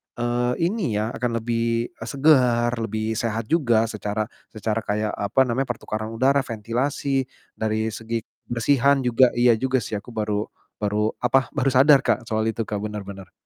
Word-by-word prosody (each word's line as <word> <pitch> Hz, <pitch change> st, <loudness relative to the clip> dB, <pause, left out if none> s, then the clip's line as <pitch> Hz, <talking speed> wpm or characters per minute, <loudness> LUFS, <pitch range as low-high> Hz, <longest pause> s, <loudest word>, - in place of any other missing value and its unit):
eee, 120 Hz, +1 st, 0 dB
ini 175 Hz, -, 0 dB
ya, 105 Hz, +2 st, 0 dB
akan 120 Hz, -2 st, -2 dB
lebih, 115 Hz, 0 st, -1 dB
eee, -, -, -10 dB
segar, 130 Hz, -5 st, +3 dB
lebih 110 Hz, 0 st, -2 dB
sehat 115 Hz, -1 st, -2 dB
juga 120 Hz, -8 st, +3 dB
secara 105 Hz, 0 st, -3 dB, 0.2 s
secara 110 Hz, 0 st, -1 dB
kayak, 105 Hz, +1 st, -1 dB
apa 100 Hz, +6 st, +1 dB
namanya, 130 Hz, +1 st, +1 dB
pertukaran 110 Hz, 0 st, -5 dB
udara, 135 Hz, +4 st, +3 dB
ventilasi, 130 Hz, +4 st, -1 dB, 0.3 s
dari 110 Hz, 0 st, -1 dB
segi 115 Hz, +1 st, -4 dB, 0.2 s
kebersihan 135 Hz, +3 st, +2 dB
juga. 125 Hz, 0 st, +4 dB
Iya 120 Hz, -2 st, +4 dB
juga 130 Hz, -1 st, +1 dB
sih 105 Hz, 0 st, -3 dB
aku 115 Hz, +4 st, -10 dB
baru 105 Hz, -1 st, -1 dB, 0.3 s
baru 105 Hz, +1 st, 0 dB
apa, 125 Hz, +1 st, +2 dB
baru 135 Hz, -2 st, 0 dB
sadar, 135 Hz, +1 st, +6 dB
Kak, 115 Hz, -2 st, 0 dB
soal 110 Hz, 0 st, 0 dB
itu, 115 Hz, -, -4 dB
Kak. 105 Hz, -1 st, -3 dB
Benar 105 Hz, -1 st, -4 dB
benar. 95 Hz, -1 st, -9 dB
115 Hz, 165 wpm, -23 LUFS, 110-130 Hz, 0.3 s, sadar